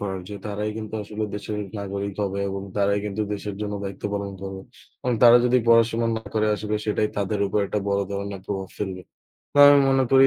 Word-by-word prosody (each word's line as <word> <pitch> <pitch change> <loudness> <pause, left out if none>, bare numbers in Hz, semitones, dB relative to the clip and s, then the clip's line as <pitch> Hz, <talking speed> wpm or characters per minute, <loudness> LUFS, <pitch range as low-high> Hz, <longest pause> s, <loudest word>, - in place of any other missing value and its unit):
করার 95 -2 -3
যে 105 - -6
তারাই 105 +1 -2
কিন্তু 110 0 -6
আসলে 105 +1 -4
দেশের 105 +1 -4 0.2
নাগরিক 100 0 -4
হবে 100 0 -2
এবং 95 0 -4
তারাই 100 0 +2
কিন্তু 105 +1 -2
দেশের 100 0 -5
জন্য 105 -1 -3
দায়িত্ব 95 +1 -7
পালন 100 -1 -3
করবে 95 0 -6 0.4
এবং 125 - 0
তারা 120 0 +9
যদি 125 +1 +4
পড়াশোনা 115 0 +4
না 110 - -5
করে 110 0 +2
আসলে 105 0 -3
সেটাই 105 0 +1
তাদের 100 0 -1
উপর 100 - 0
একটা 105 - -1
বড় 100 0 +2
ধরনের 100 -1 -4
প্রভাব 95 -2 -3
ফেলবে। 95 -3 -4 0.5
বা 145 - +9
আমি 145 -1 +7
মনে 135 -1 +3
করি 135 0 +8
105 Hz, 205 wpm, -24 LUFS, 100-110 Hz, 0.5 s, তারা